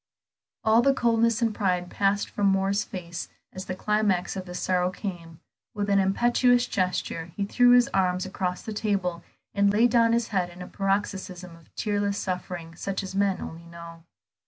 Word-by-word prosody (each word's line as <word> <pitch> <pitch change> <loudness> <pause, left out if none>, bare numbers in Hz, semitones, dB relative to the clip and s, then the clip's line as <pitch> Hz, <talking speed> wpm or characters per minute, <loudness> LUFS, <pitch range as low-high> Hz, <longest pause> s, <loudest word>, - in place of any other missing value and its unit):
All 220 +1 +5
the 275 +2 +3
coldness 230 -1 +2
and 225 -2 +1
pride 180 -4 -1
passed 200 0 +1
from 205 -1 0
Moor's 195 +1 +2
face 175 -3 -7 0.2
as 185 +1 -7
the 185 - -4
climax 205 -3 0
of 190 -1 -6
his 180 0 -6
sorrow 180 -1 +1
came; 175 -4 -7 0.4
with 205 -1 -1
an 200 - +4
impetuous 240 +5 +3
gesture 180 -5 -2
he 200 - 0
threw 245 +4 +5
his 245 -1 +6
arms 185 -1 +1
across 185 -1 -3
the 220 - -5
table, 195 -5 -1 0.3
and 200 0 +3
laid 225 +3 +3
down 230 -1 +4
his 235 -1 0
head 185 -4 0
in 175 +1 -14
a - - -9
paroxysm 195 -3 -3
of 165 -1 -21
tearless 205 -1 -1
suffering 180 -3 -4
such 195 +3 -3
as 190 - -7
men 195 -1 +1
only 165 +1 -8
know. 170 -1 -11
195 Hz, 180 wpm, -26 LUFS, 180-210 Hz, 0.4 s, his